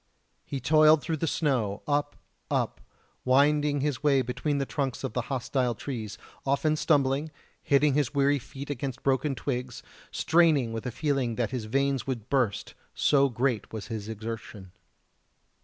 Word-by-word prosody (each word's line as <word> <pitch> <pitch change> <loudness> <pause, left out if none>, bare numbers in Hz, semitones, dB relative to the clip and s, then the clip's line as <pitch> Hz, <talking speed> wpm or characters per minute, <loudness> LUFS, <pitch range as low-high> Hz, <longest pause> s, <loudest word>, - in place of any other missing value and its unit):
He 140 - -5
toiled 155 +2 +5
through 160 +3 -2
the 165 - -1
snow, 125 -11 0
up, 145 0 0 0.3
up, - - -1 0.4
winding 145 +2 +3
his 145 -2 -1
way 140 -3 +3
between 125 +4 -2
the 140 - 0
trunks 135 -3 -3
of - - -3
the 125 - 0
hostile 130 -2 -1
trees 110 -3 -5 0.3
often 140 +3 +1
stumbling 145 -1 +1 0.3
hitting 140 0 +3
his 145 -3 +1
weary 140 0 +2
feet 140 +2 -8
against 130 -2 -5
broken 135 +1 +1
twigs 125 -3 -4 0.3
straining 155 -8 +3
with 115 +3 -4
a - - -2
feeling 130 -2 -1
that 120 0 -1
his 125 -4 -3
veins 135 +3 0
would 120 -5 -4
burst, 125 -8 0 0.2
so 140 -1 +3
great 120 -2 -1
was 110 0 -7
his 110 -1 -5
exertion. 110 -3 -7
135 Hz, 155 wpm, -28 LUFS, 120-145 Hz, 0.4 s, toiled